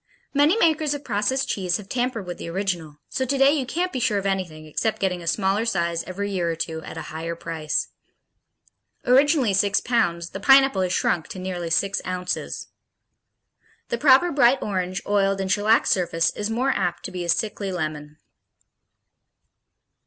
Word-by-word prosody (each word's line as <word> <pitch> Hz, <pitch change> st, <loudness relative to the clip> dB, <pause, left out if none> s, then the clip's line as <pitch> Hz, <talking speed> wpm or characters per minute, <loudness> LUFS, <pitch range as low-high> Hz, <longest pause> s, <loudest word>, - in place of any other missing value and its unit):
Many 295 Hz, +7 st, +4 dB
makers 310 Hz, -6 st, +2 dB
of 285 Hz, -, -8 dB
processed 240 Hz, +3 st, 0 dB
cheese 180 Hz, -3 st, -1 dB
have 205 Hz, -, -11 dB
tampered 245 Hz, -3 st, -2 dB
with 175 Hz, 0 st, -7 dB
the -, -, -6 dB
original, 170 Hz, -5 st, -3 dB
so 260 Hz, -, -2 dB
today 270 Hz, +1 st, +3 dB
you 280 Hz, -4 st, -1 dB
can't 360 Hz, +7 st, -2 dB
be 260 Hz, -, -2 dB
sure 215 Hz, -3 st, +1 dB
of 200 Hz, -, -3 dB
anything 180 Hz, -5 st, -2 dB
except 215 Hz, +8 st, -1 dB
getting 180 Hz, -2 st, -1 dB
a 170 Hz, -, -9 dB
smaller 195 Hz, +4 st, +1 dB
size 170 Hz, -6 st, -1 dB
every 200 Hz, +2 st, -4 dB
year 175 Hz, -3 st, -1 dB
or 165 Hz, -, -1 dB
two, 160 Hz, 0 st, -4 dB
at -, -, -9 dB
a -, -, -5 dB
higher 165 Hz, +1 st, -4 dB
price. 160 Hz, -2 st, -3 dB, 1.2 s
Originally 270 Hz, -3 st, +4 dB
six 200 Hz, +1 st, +2 dB
pounds, 175 Hz, -8 st, 0 dB
the 195 Hz, -, -6 dB
Pineapple 270 Hz, -1 st, +5 dB
has 185 Hz, -1 st, 0 dB
shrunk 170 Hz, -2 st, 0 dB
to -, -, -8 dB
nearly 180 Hz, -2 st, -4 dB
six 195 Hz, +4 st, +1 dB
ounces. 180 Hz, 0 st, -4 dB, 1.2 s
The 235 Hz, -, -2 dB
proper 275 Hz, +5 st, +5 dB
bright 270 Hz, -3 st, +4 dB
orange, 185 Hz, -2 st, -3 dB
oiled 195 Hz, -1 st, +1 dB
and 190 Hz, -1 st, -2 dB
shellacked 210 Hz, +3 st, +3 dB
surface 165 Hz, -3 st, +1 dB
is 210 Hz, +1 st, -4 dB
more 250 Hz, +4 st, +1 dB
apt 175 Hz, -6 st, -2 dB
to -, -, -5 dB
be 180 Hz, -1 st, -4 dB
a 170 Hz, -, -5 dB
sickly 205 Hz, +1 st, -1 dB
lemon. 155 Hz, -3 st, -5 dB
195 Hz, 175 wpm, -23 LUFS, 175-245 Hz, 1.2 s, Pineapple